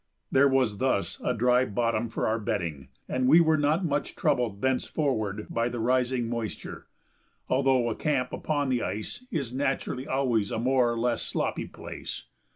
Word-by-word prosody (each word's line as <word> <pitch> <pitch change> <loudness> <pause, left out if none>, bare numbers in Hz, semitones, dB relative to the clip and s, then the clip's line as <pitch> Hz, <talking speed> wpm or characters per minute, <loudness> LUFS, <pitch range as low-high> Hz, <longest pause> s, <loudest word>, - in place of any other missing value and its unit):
There 140 +1 +5
was 130 -7 +1
thus 130 -7 0
a - - +1
dry 125 +2 +4
bottom 115 0 0
for - - -2
our 110 +1 +1
bedding, 80 -9 -3 0.2
and 130 0 0
we 155 +6 +8
were 160 -2 +4
not 155 +4 +1
much 145 -2 -1
troubled 125 -9 0
thenceforward 125 -5 -1
by 115 +1 0
the 120 - -5
rising 125 0 +1
moisture, 115 -2 -5 0.6
although 130 -2 +2
a 115 - 0
camp 130 -1 -1
upon 145 -3 -1
the 125 -2 +1
ice 110 - -4
is 135 -8 -3
naturally 135 -1 -2
always 125 -6 +1
a - - -2
more 125 0 +2
or 120 - -3
less 120 +1 0
sloppy - - -2
place. - - -7
125 Hz, 165 wpm, -27 LUFS, 115-135 Hz, 0.6 s, we